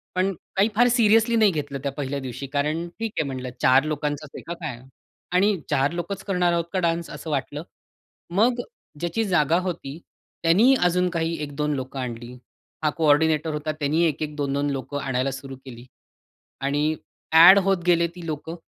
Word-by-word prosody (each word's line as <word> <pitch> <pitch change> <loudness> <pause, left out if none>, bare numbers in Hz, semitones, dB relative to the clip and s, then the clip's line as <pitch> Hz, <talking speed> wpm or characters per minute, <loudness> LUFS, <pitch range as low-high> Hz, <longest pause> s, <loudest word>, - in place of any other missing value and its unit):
पण 190 +1 +1 0.2
काही 200 +3 +3
फार 245 +3 +5
सीरियसली 230 -1 +4
नाही 215 -3 +5
घेतलं 145 -4 -4
त्या 140 - -1
पहिल्या 140 0 -4
दिवशी 130 +1 -6
कारण 155 +4 -1
ठीक 225 -2 -2
आहे 155 - +1
म्हटलं, 130 -1 -5
4 130 +2 +5
लोकांचाच 150 -1 -3
आहे - - -7
का 170 - -3
काय 150 -8 -7 0.5
आणि 195 +2 +3
4 140 0 +2
लोकच 190 +3 -4
करणार 180 -3 +1
आहोत 170 -1 0
का 190 - +1
डान्स, 170 -1 -1
असं 160 - -8
वाटलं. 145 +2 -3 0.7
मग 230 +7 +2 0.4
ज्याची 175 +6 -1
जागा 170 -4 +2
होती, 170 -5 -5 0.4
त्यांनी 205 +11 +5
अजून 180 +1 +2
काही 165 -1 -1
1-2 150 +1 -2
लोकं 130 0 -5
आणली. 120 -1 -6 0.5
हा 155 - +3
कोऑर्डिनेटर 155 0 +2
होता. 150 +1 -2
त्यांनी 155 +3 +1
1-1 150 -1 -2
2-2 140 0 -1
लोकं 140 +1 -4
आणायला 135 0 -1
सुरू 135 0 -8
केली. 120 -2 -10 0.8
आणि 145 +3 0 0.4
ॲड 180 +5 +10
होत 195 -1 +3
गेले 170 -1 +4
ती 175 - -9
लोकं 160 +1 -5
155 Hz, 170 wpm, -24 LUFS, 140-180 Hz, 0.8 s, ॲड